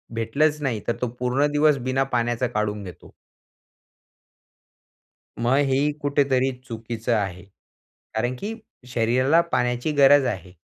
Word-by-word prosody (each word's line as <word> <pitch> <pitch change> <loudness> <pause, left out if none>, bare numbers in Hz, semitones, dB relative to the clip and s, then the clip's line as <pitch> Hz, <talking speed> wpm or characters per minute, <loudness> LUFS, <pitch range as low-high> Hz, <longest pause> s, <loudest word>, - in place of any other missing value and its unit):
भेटलंच 145 +7 +1
नाही, 120 -7 -2
तर 120 - 0
तो 125 - +1
पूर्ण 130 +4 +1
दिवस 150 0 +3
बिना 135 +1 +1
पाण्याचा 120 +1 0
काढून 105 -1 -2
घेतो. 90 - -11 2.3
मग 120 +3 +2
हे 140 +3 +2
कुठेतरी 140 -2 +1 0.2
चुकीचं 115 0 -3
आहे, 95 -4 -3 0.7
कारण 120 +3 -1
की 215 +2 -4 0.4
शरीराला 130 +7 +3
पाण्याची 125 +4 0
गरज 145 -1 +5
आहे. 95 -7 -4
125 Hz, 120 wpm, -23 LUFS, 115-140 Hz, 2.3 s, गरज